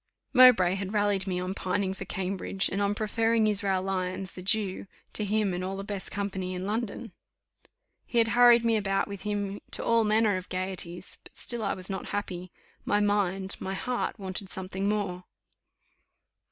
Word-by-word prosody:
Mowbray 245 -9 +7
had 195 +1 -4
rallied 205 -2 +1
me 180 -1 -1
on 180 +1 -3
my - - -2
pining 190 0 -1
for 195 0 -7
Cambridge, 190 +1 -2
and 195 - -2
on 200 0 +1
preferring 225 +1 +2
Israel 195 -3 +3
Lyons, 185 0 -2
the 185 - -8
Jew, 195 0 0 0.3
to 215 - +1
him 210 -1 +1
and 180 +1 -3
all 190 +1 -3
the 195 - -4
best 200 -2 -4
company 190 -2 -3
in 180 +1 -4
London. 225 +1 -3 1.0
He 240 - -3
had 225 -1 +4
hurried 240 0 +6
me 225 -1 +3
about 195 -2 0
with 200 -2 -7
him 205 -1 -3
to - - -1
all 230 -1 +4
manner 215 -2 +3
of 185 - -8
gaieties, 185 -1 -4
but - - -17
still 240 -2 -1
I 200 - 0
was 185 0 -4
not 190 -2 -4
happy; 180 -3 -4 0.3
my 205 - +2
mind 195 -2 0
my 190 +1 -3
heart 250 +4 -2
wanted 190 -1 -5
something 190 +1 -3
more. 190 -4 -2
195 Hz, 180 wpm, -28 LUFS, 185-210 Hz, 1.0 s, Mowbray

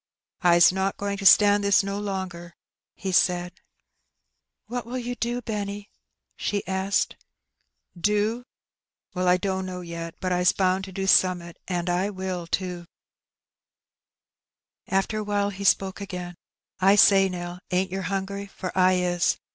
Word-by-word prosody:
"I's 175 -1 +6
not 190 +1 -1
going 200 0 -3
to 195 -1 +3
stand 205 0 +6
this 200 0 +4
no 200 +1 -3
longer," 185 -4 -5 0.4
he 190 - -4
saicl. 180 0 +2 0.6
" - - -55
What 245 0 -4
will 250 +2 -4
you 245 0 -4
do, 240 0 -3
Benny? 205 -1 -5 0.2
" - - -58
she 205 -1 -2
asked. 190 +1 -1 0.8
"Do? 210 +6 0 0.7
Well, 180 0 -1
I 180 0 +5
dunno, 185 -1 -3
yet; 170 -1 -7
"but 185 - -2
Ts 180 0 +3
bound 190 0 +1
to 190 - -10
do 195 +1 -4
aome'at, 180 -3 +2
asi.' 175 -1 -1
I 185 +3 0
will 185 -3 -5
too." 175 -1 -3 2.0
Afler 195 +3 0
awhile 205 -1 -1
he 200 0 -7
spoke 195 0 +2
i^ain. 180 -3 -6 0.5
"I 195 +2 +5
say, 195 -2 +6
Nell, 175 0 -6
ain't 185 +1 0
yer 190 +1 -3
hungry? 195 +2 -3
for 190 -2 -7
I 185 0 +4
is. 180 -1 +1
190 Hz, 145 wpm, -25 LUFS, 180-200 Hz, 2.0 s, I's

